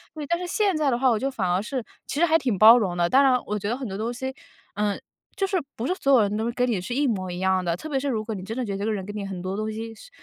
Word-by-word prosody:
对， 305 -1 -5
但 340 +4 0
是 360 - -4
现 400 0 +1
在 305 -2 +2
的 240 - +1
话 260 +1 +3
我 220 - +1
就 270 - -1
反 215 -9 -2
而 180 +2 +2
是 250 +3 -4 0.2
其 285 - -3
实 345 - +5
还 325 -1 +3
挺 250 -9 -1
包 220 +5 +9
容 185 -5 -1
的。 175 0 +2
当 270 +10 +5
然 260 -2 +5
我 210 0 -2
觉 205 - -3
得 240 - -1
很 265 -2 -5
多 195 - -5
东 225 +3 -2
西 260 +2 -4 0.4
嗯， 205 0 0 0.4
就 390 - +1
是 385 -1 0 0.2
不 230 - -4
是 365 - +1
所 275 -7 +2
有 250 - +7
人 205 0 0
都 225 +2 -1
跟 250 +1 +1
你 215 -5 0
是 190 - -5
一 290 +2 +2
模 190 -6 -1
一 175 - -5
样 190 0 +1
的， 170 -1 0
特 315 - -8
别 275 -3 0
是 285 - -3
如 220 -4 -1
果 225 - -3
你 190 - -6
真 220 +5 -5
的 255 - -1
觉 205 - -4
得 - - -3
这 200 - -2
个 220 - 0
人 195 -3 -4
跟 205 +1 -7
你 205 -1 -4
很 190 -2 -5
多 185 +1 -3
东 215 +1 -2
西 225 +1 -6
是 355 - -14
225 Hz, 380 characters per minute, -25 LUFS, 200-270 Hz, 0.4 s, 包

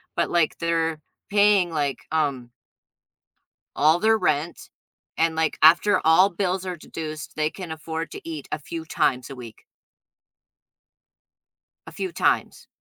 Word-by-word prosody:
but - - 0
like 170 -3 +1
they're 165 -2 0 0.3
paying 205 -3 +4
like, 145 -4 -1
um 140 -6 -1 1.2
all 155 +3 +4
their 220 +2 +3
rent, 155 -3 -2 0.5
and 165 0 +2
like 160 0 0
after 175 +5 +5
all 180 +5 +6
bills 185 0 -2
are 180 -1 -4
deduced, 155 -2 -8
they 155 0 0
can 180 -1 -8
afford 160 +1 -5
to - - -8
eat 155 -4 -6
a 155 - -2
few 165 +3 -7
times 135 -6 0
a 135 - -8
week. 120 -3 -12 2.2
A - - -9
few 185 +1 -4
times. - - 0
160 Hz, 135 wpm, -24 LUFS, 155-180 Hz, 2.2 s, all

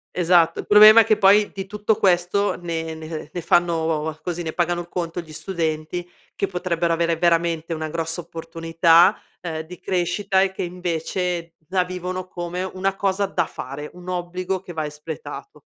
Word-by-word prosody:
Esatto, 170 -2 +3
il - - -6
problema 215 +2 +9
è 220 - +6
che 215 -1 +3
poi 205 +1 +5
di 195 -1 -6
tutto 210 +2 0
questo 185 +2 +2
ne 165 -1 -3
ne 160 -1 -7
ne 175 - -3
fanno, 160 -2 +1
così, 175 -1 -4
ne 160 - -4
pagano 175 0 -1
conto 175 -1 -4
gli 155 -2 -13
studenti 165 0 -3 0.3
che 200 - 0
potrebbero 175 -2 -1
avere 170 0 +1
veramente 170 -1 +1
una 155 -1 -4
grossa 165 +1 -3
opportunità, 165 +3 +3 0.2
ehm, 160 -3 -4
di 170 +2 -11
crescita 190 +2 0
e 190 - 0
che - - -6
invece 175 -1 -3
la 185 -1 +2
vivono 185 0 -5
come 175 +1 -5
una 190 +1 -2
cosa 195 0 0
da 195 - -1
fare, 140 +3 -7
un 180 0 -13
obbligo 180 +1 -3
che 180 - -10
va 155 -1 -2
espletato. 150 - -8
175 Hz, 170 wpm, -22 LUFS, 165-185 Hz, 0.3 s, problema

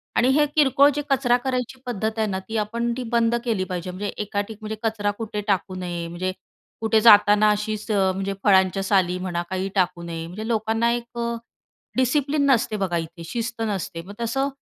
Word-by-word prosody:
आणि 245 - +4
हे 300 - +5
किरकोळ 285 -1 +5
जे 295 - -1
कचरा 260 -3 +3
करायची 255 0 -2
पद्धत 220 -2 -2
आहे 220 - +2
ना 190 -2 -2
ती 225 - -2
आपण 230 +3 -1
ती 255 - -3
बंद 235 0 +3
केली 220 -6 0
पाहिजे. 180 -1 -4
म्हणजे 195 +3 -4
एका 205 -1 -1
ठिक 220 - -8
म्हणजे 215 0 -4
कचरा 215 -2 0
कुठे 215 -2 -3
टाकू 190 -2 0
नये, 175 -2 -4
म्हणजे 175 +2 -3 0.5
कुठे 220 0 +3
जाताना 210 -1 +7
अशीच 210 +1 -3
म्हणजे 195 -1 +1
फळांच्या 190 -1 +4
साली 185 -3 +2
म्हणा 175 -2 -2
काही 190 +1 -2
टाकू 180 -2 +1
नये. 165 -1 -5
म्हणजे 210 +6 -6
लोकांना 225 +1 +1
एक 240 0 -6
अ, 235 - -1 0.7
डिसिप्लिन 280 +3 +2
नसते 225 -3 +1
बघा 185 -4 -1
इथे, 165 +1 -6
शिस्त 230 +4 -4
नसते. 190 -4 -3
मग 200 - -9
तसं 270 +5 0
210 Hz, 190 wpm, -23 LUFS, 190-235 Hz, 0.7 s, जाताना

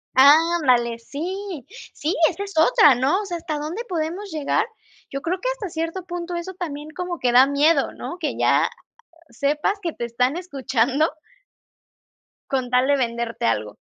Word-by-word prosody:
Ándale, 275 -5 +5
sí 345 - -6 0.3
sí, 315 +4 -2
esa 385 +3 -5
es 400 0 -8
otra, 295 -1 +6
¿no?, 270 - +1
o - - -6
sea, 350 -3 -4
¿hasta 320 -2 -4
dónde 315 +10 -4
podemos 350 +4 -3
llegar? 315 +8 0 0.4
Yo 275 0 -5
creo 360 +2 -1
que - - 0
hasta 460 -6 -4
cierto 330 +3 -4
punto 350 0 -5
eso 345 +2 -5
también 310 -5 -6
como 355 +1 -4
que 250 -5 +1
da 255 +3 +7
miedo, 290 +4 +3
¿no?, 345 - -7
que 315 - -2
ya - - +3 0.6
sepas 295 - -1
que 335 -4 -3
te 240 - -4
están 250 +5 0
escuchando 275 -3 0 1.4
Con 260 -2 0
tal 250 +1 +3
de 285 0 +3
venderte 235 0 -3
algo. 105 -2 -1
310 Hz, 165 wpm, -22 LUFS, 260-355 Hz, 1.4 s, da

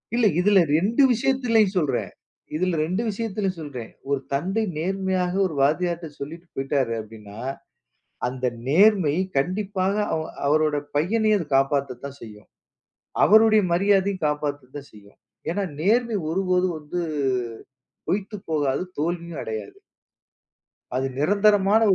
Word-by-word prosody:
இல்லை 235 -3 +4
இதில் 195 0 +5 0.2
ரெண்டு 220 - +3
விஷயத்திலும் 230 -4 +2
சொல்றேன். 140 -8 0 0.4
இதில் 180 +2 0
ரெண்டு 185 +6 -1
விஷயத்திலும் 200 -3 -2
சொல்றேன். 135 -7 -7 0.2
ஒரு 140 -1 +1
தந்தை 190 +10 0
நேர்மையாக 185 +1 -1
ஒரு 160 - -7
வாத்தியார் 170 +4 +2
கிட்ட 155 -4 -10
சொல்லிவிட்டு 165 +5 -8
போய்விட்டார் 135 -2 0
அப்படி 110 +1 -9
என்றால் 105 +5 -6 0.8
அந்த 130 +1 -2 0.2
நேர்மை 185 -1 +5 0.2
கண்டிப்பாக 190 +5 0 0.2
அவ் 160 -1 -2 0.2
அவரோட 155 +1 +2 0.2
பையனையும் 215 +7 +2
அது 170 - -5
காப்பாற்றத்தான் 140 -1 -1
செய்யும். 105 -2 -12 0.8
அவருடைய 215 0 +6
மரியாதையும் 195 -1 +2
காப்பாற்றத்தான் 145 -2 -4
செய்யும். 100 -1 -17 0.3
ஏன் 165 - -1
என்றால் 195 -6 -2
நேர்மை 230 +4 +2
ஒருபோதும் 180 0 +1
வந்து 155 +4 -4 1.1
போய்விட்டு 205 +2 -2
போகாது, 145 -2 0 0.2
தோல்வியும் 170 0 -3
அடையாது. 110 -2 -6 1.2
அது 130 +1 0
நிரந்தரமான 205 +5 +4
175 Hz, 120 wpm, -24 LUFS, 140-200 Hz, 1.2 s, அவருடைய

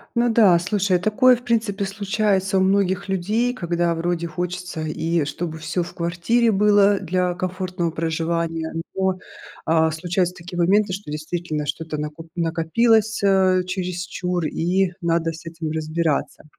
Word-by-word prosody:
Ну 235 0 +3
да, 200 -7 +5
слушай, 190 0 +1
такое, 245 +7 +4
в 245 - -11
принципе, 220 -4 0
случается 195 -1 0
у - - +2
многих 195 0 +1
людей, 210 +7 0
когда 170 -4 0
вроде 170 0 -1
хочется, 180 0 -4
и 160 +1 -1
чтобы 160 +2 -4
всё 160 +3 -2
в 170 - -5
квартире 180 +8 +1
было 205 0 +4
для 180 0 0
комфортного 185 -1 -3
проживания, 165 0 -2 0.2
но, 190 -1 0 0.5
а, 160 0 +3
случаются 175 +3 -1
такие 175 0 -7
моменты, 195 +2 +3
что 195 -5 -6
действительно 155 0 -3
что-то 160 0 -4
накоп 150 +2 -6
накопилось, 200 +7 +2
э, 190 -2 +4
чересчур, 180 -1 -3
и 180 +4 +1
надо 165 -1 +1
с 165 +1 -11
этим 160 -1 -5
разбираться. 155 -1 -1
180 Hz, 140 wpm, -22 LUFS, 165-195 Hz, 0.5 s, да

